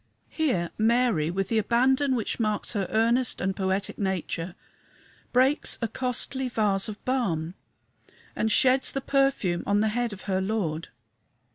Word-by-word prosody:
Here 220 - 0
Mary, 225 -8 +2
with 195 +2 -2
the 225 - +2
abandon 260 +5 +2
which 230 0 -2
marks 215 0 -1
her 200 -4 -1
earnest 230 +3 +2
and 190 +1 -1
poetic 190 +1 -2
nature, 185 -3 -3 0.8
breaks 260 +4 +3
a 230 - -1
costly 255 +2 -2
vase 205 -3 +1
of 210 - -9
balm 180 -11 -1 0.8
and 220 - 0
sheds 260 +2 +3
the 275 - -2
perfume 270 -11 +1
on 205 +1 +2
the 220 - +2
head 240 +1 -1
of 195 -2 -9
her 190 -1 -1
Lord. 190 -6 -2
220 Hz, 145 wpm, -26 LUFS, 190-250 Hz, 0.8 s, breaks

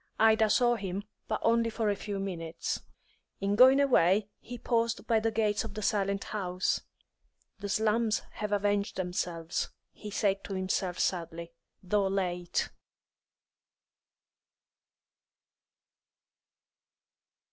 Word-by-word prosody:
Ida 220 0 +5
saw 240 +1 +3
him, 195 -1 -4 0.2
but - - -1
only 230 0 +3
for 220 -2 0
a - - 0
few 205 0 -5
minutes. 170 -4 -3 0.6
In 200 +1 0
going 260 +4 +7
away, 210 -7 +4
he 245 +1 -8
paused 230 0 0
by 225 -2 +3
the 225 +1 +1
gates 215 -2 +1
of 215 -3 -8
the 215 - -4
silent 200 -1 0
house. 185 -3 -1 0.8
"The 200 0 -5
slums 220 +2 +1
have 210 -1 -4
avenged 205 0 +1
themselves," 175 -2 -2 0.2
he 210 - -9
said 200 -1 0
to 195 - -4
himself 185 -1 -1
sadly, 170 -1 -2 0.3
"though 195 +1 +1
late." 180 -3 -1
205 Hz, 115 wpm, -30 LUFS, 185-220 Hz, 0.8 s, going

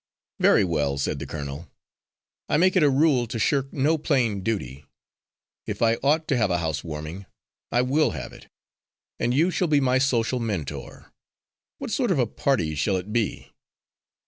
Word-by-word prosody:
"Very - - +5
well," 75 -6 0
said 70 +1 -2
the 70 - -6
colonel. 70 +2 -6 0.8
"I - - +3
make 185 +4 +3
it 185 - +4
a 150 - +5
rule 135 -3 +3
to 115 - -4
shirk 135 +4 0
no 150 +3 +1
plain 115 -9 +1
duty. 75 - -3 0.8
If - - -2
I 115 0 +3
ought 155 +3 +2
to 135 - +2
have 110 -4 +2
a 90 - +1
house 80 -5 -2
warming, 80 +4 -7 0.4
I 120 +1 +3
will 145 +5 +2
have 65 -6 -6
it. - - -14 0.7
And 120 - +1
you 160 +8 +3
shall 180 - 0
be 150 -2 +3
my 130 -1 +2
social 125 -2 +1
mentor. 100 - -5 0.6
What - - -6
sort 245 -1 0
of 185 - +2
a 125 - +3
party 110 - 0
shall 75 +7 0
it 95 +4 -6
be?" 115 -3 -2
115 Hz, 175 wpm, -25 LUFS, 85-140 Hz, 0.8 s, Very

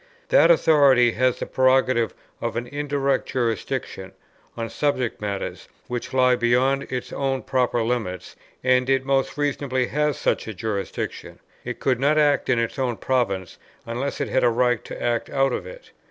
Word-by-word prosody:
That - - +6
authority 140 - +5
has 130 +1 +1
the - - -4
prerogative 130 -4 +2 0.3
of - - -3
an 120 +1 -2
indirect 140 0 -1
jurisdiction 115 -5 -3 0.4
on 115 -1 -3
subject 130 -4 -1
matters 100 -2 -4 0.2
which 120 -1 -4
lie 125 -1 +4
beyond 130 +3 +1
its 125 -1 -4
own 135 -1 -1
proper 125 -2 0
limits, 110 -6 -3 0.3
and 125 0 +3
it 135 0 +2
most 135 0 0
reasonably 140 -3 0
has 150 -1 0
such - - -1
a 110 - -6
jurisdiction. 100 0 -4 0.3
It - - -6
could 130 -3 +1
not 145 +3 +2
act 145 -4 +2
in 125 - +3
its 115 +3 -2
own 125 -4 -1
province, 100 -8 -1 0.3
unless 125 +4 -3
it - - -2
had 130 - +1
a 120 - +5
right 125 -1 +1
to - - -8
act 120 -1 -1
out 135 -2 +1
of - - -4
it. - - -12
130 Hz, 170 wpm, -23 LUFS, 120-135 Hz, 0.4 s, That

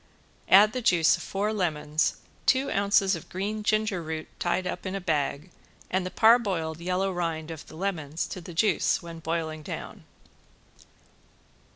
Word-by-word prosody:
Add 210 +3 +7
the 255 - -2
juice 175 -8 +4
of - - -8
four 205 +2 -2
lemons, 155 -5 0 0.3
two 265 +1 +3
ounces 200 -1 +3
of 165 - -10
green 205 +4 -3
ginger 215 -3 +1
root 160 -1 -5
tied 180 +1 0
up - - -4
in 185 - -3
a - - -2
bag 155 -1 -1 0.4
and 185 0 +1
the - - -4
parboiled 195 -9 +3
yellow 185 +2 0
rind 165 -2 -3
of 160 -2 -9
the - - -12
lemons 160 -4 -2
to 185 - -6
the 170 0 -10
juice 195 -2 +2
when 170 -1 -8
boiling 160 -1 -3
down. - - -7
180 Hz, 160 wpm, -27 LUFS, 160-200 Hz, 0.4 s, Add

